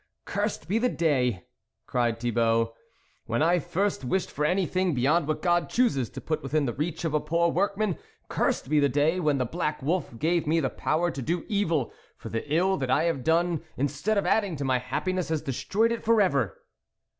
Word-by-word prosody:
" - - -54
Cursed 205 +1 -2
be 210 +6 +1
the 250 +2 +2
day! 125 - 0 0.2
" - - -57
cried 120 -2 0
Thibault, 115 -1 +1 0.3
" - - -39
when 115 +6 +1
I 175 +2 +3
first 195 +2 -1
wished 185 +9 -1
for 150 - -3
anything 185 0 +1
be 125 - -1
yond 150 +4 +2
what 155 - -2
God 175 -1 +2
chooses 140 - +1
to - - -8
put 155 -1 -2
within 145 +1 0
the 120 - -2
reach 155 +5 -3
of 160 - -1
a 150 - +3
poor 170 +3 +1
workman! 200 +2 0 0.3
Cursed - - 0
be 150 +2 +3
the 140 -1 +3
day 150 +7 +2
when 150 -5 +2
the 130 - 0
black 155 +3 -2
wolf 160 -5 -1
gave 165 +4 +1
me 165 +2 +3
the 135 -5 -1
power 170 +3 0
to 140 - -6
do 170 +6 -2
evil, 170 - 0 0.2
for - - -8
the 115 +6 -4
ill 185 +5 +2
that 130 -2 -3
I 140 +4 +3
have 165 -6 0
done, 170 +1 +2 0.2
instead 145 +10 0
of 200 - +1
adding 200 -6 +1
to 140 - -4
my 130 -1 +2
happiness, 180 +9 -2
has 160 -2 -1
destroyed 205 - 0
it 235 - -3
for 230 0 +4
ever 140 - +1
160 Hz, 215 wpm, -27 LUFS, 135-180 Hz, 0.3 s, for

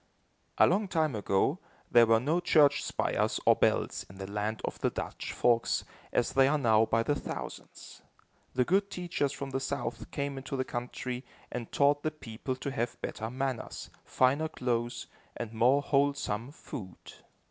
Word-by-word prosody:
A - - +7
long 200 +3 +2
time 160 -5 +1
ago, 105 - +1 0.3
there 120 -1 +7
were 115 0 +5
no 150 +8 +1
church 150 -5 +4
spires - - 0
or - - +7
bells - - +1
in 95 - -13
the 95 - -5
land 105 +2 -2
of - - -5
the - - +2
Dutch - - -5
folks, 120 -1 +2 0.3
as 120 - +1
there 135 +1 +5
are - - +3
now 110 -5 +4
by 115 0 +2
the 145 - +1
thousands. - - -7 0.5
The 125 0 +3
good 200 +5 +2
teachers 175 -7 -1
from 140 -1 -6
the 135 - -1
South 140 +1 -4
came 140 -1 -3
into 135 +1 -5
the 130 - 0
country 125 +1 -4 0.3
and 120 -2 -5
taught 145 +1 +3
the 155 - 0
people 130 -3 -5
to 140 +2 -4
have 120 -3 -2
better 110 +1 -4
manners, 130 -1 -4
finer 140 +5 +2
clothes 120 -4 -2 0.3
and 115 -2 -5
more 125 +5 +4
wholesome 140 -5 +1
food. 95 - -8
130 Hz, 170 wpm, -30 LUFS, 115-145 Hz, 0.5 s, A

